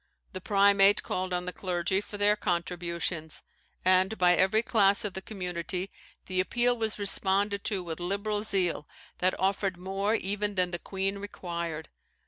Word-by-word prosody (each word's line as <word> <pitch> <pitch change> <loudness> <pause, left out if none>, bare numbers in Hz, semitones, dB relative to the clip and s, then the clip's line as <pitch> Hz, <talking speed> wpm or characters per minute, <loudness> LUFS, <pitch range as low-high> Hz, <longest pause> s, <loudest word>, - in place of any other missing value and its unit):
The 185 - -5
primate 200 0 +4
called 185 0 -3
on 180 0 -2
the 180 - -4
clergy 180 +2 -1
for 205 - -9
their 205 +1 +3
contributions; 170 -3 -3 0.4
and 185 +3 +3
by 180 -1 +5
every 190 +5 +3
class 205 -3 +3
of 200 - -3
the 190 - -4
community 180 -1 -4 0.3
the 185 -1 -2
appeal 240 +6 +1
was 220 -2 -3
responded 200 0 +3
to 195 -4 -1
with 165 -1 -6
liberal 200 +4 -2
zeal, 185 -7 +1 0.3
that 185 +1 +1
offered 195 -1 0
more 195 +4 -1
even 205 0 -2
than 180 -1 +1
the 175 - -3
queen 195 +2 -3
required. 170 -5 -5
190 Hz, 155 wpm, -28 LUFS, 180-205 Hz, 0.4 s, by